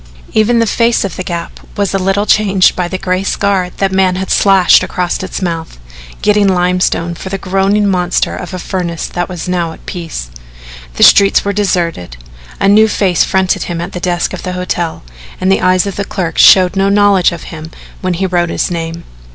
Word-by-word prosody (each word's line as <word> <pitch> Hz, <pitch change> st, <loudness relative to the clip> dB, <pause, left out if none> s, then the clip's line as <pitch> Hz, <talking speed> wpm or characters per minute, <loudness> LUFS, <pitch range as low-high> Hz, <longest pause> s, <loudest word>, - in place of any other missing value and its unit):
Even 220 Hz, +2 st, +2 dB
the 230 Hz, -, +3 dB
face 230 Hz, 0 st, +1 dB
of 195 Hz, -, -5 dB
the -, -, -5 dB
Gap 170 Hz, -2 st, -6 dB, 0.2 s
was 200 Hz, -1 st, -1 dB
a 195 Hz, -, +1 dB
little 195 Hz, +2 st, 0 dB
changed 195 Hz, -3 st, +3 dB
by 180 Hz, -1 st, -2 dB
the 185 Hz, -, -4 dB
gray 185 Hz, 0 st, -1 dB
scar 195 Hz, -2 st, 0 dB
that 195 Hz, -1 st, 0 dB
man 190 Hz, -1 st, +2 dB
had 190 Hz, +1 st, -4 dB
slashed 195 Hz, -3 st, +4 dB
across 180 Hz, -1 st, -2 dB
its 185 Hz, 0 st, -5 dB
mouth, 165 Hz, -, -4 dB, 0.5 s
getting 210 Hz, -1 st, +3 dB
limestone 180 Hz, -2 st, 0 dB
for 180 Hz, +3 st, -8 dB
the 195 Hz, -, -3 dB
groaning 195 Hz, +2 st, 0 dB
monster 180 Hz, -2 st, 0 dB
of 180 Hz, -, -7 dB
a 185 Hz, -, -5 dB
furnace 175 Hz, -2 st, -4 dB
that 175 Hz, 0 st, -4 dB
was 180 Hz, -2 st, -6 dB
now 175 Hz, -2 st, -2 dB
at -, -, -17 dB
peace. 165 Hz, -, -6 dB, 0.6 s
The -, -, +2 dB
streets 200 Hz, 0 st, +5 dB
were 200 Hz, -, -1 dB
deserted. 170 Hz, -, -2 dB, 0.4 s
A 195 Hz, -, +1 dB
new 215 Hz, +2 st, +5 dB
face 190 Hz, -5 st, +1 dB
fronted 190 Hz, -1 st, 0 dB
him 170 Hz, -1 st, -4 dB
at 170 Hz, -, -5 dB
the 180 Hz, -, -6 dB
desk 175 Hz, -1 st, -1 dB
of -, -, -6 dB
the 185 Hz, -, -5 dB
hotel 175 Hz, -, -3 dB, 0.4 s
and 185 Hz, +1 st, +1 dB
the 195 Hz, -, +2 dB
eyes 185 Hz, 0 st, +2 dB
of 200 Hz, -, -5 dB
the 200 Hz, -, -1 dB
clerk 180 Hz, -4 st, -4 dB
showed 185 Hz, 0 st, +6 dB
no 195 Hz, 0 st, +1 dB
knowledge 200 Hz, -2 st, +3 dB
of 170 Hz, -1 st, -8 dB
him 160 Hz, 0 st, -8 dB, 0.3 s
when 185 Hz, -1 st, -1 dB
he 190 Hz, +3 st, -1 dB
wrote 175 Hz, -2 st, 0 dB
his -, -, -2 dB
name. 165 Hz, 0 st, -5 dB
185 Hz, 205 wpm, -13 LUFS, 175-195 Hz, 0.6 s, showed